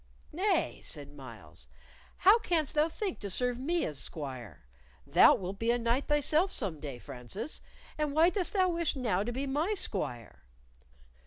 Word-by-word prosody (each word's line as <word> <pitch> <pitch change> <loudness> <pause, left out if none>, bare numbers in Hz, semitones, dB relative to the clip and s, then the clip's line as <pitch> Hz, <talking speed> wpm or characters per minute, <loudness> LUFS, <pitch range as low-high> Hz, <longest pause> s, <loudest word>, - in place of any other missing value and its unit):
"Nay," 375 +2 0
said 145 -2 -4
Myles; 105 - -10 0.5
"how 405 +5 +6
canst 340 -9 0
thou 305 +2 +3
think 385 +2 -4
to 200 - -5
serve 245 +5 0
me 335 +6 0
as 150 -3 -5
squire? 130 - -7 0.4
Thou - - +7
wilt 190 +1 -6
be 230 - 0
a 240 - +4
knight 235 +3 0
thyself 300 +5 +3
some 185 - -3
day, 140 -4 -6
Francis, 125 - -6 0.4
and 300 -1 0
why 325 +4 +5
dost 375 -3 0
thou 375 -2 +3
wish 335 -3 0
now 220 -8 0
to 230 +4 -2
be 265 +3 -3
my 305 +10 0
squire?" 125 - -3
245 Hz, 165 wpm, -31 LUFS, -, 0.5 s, Thou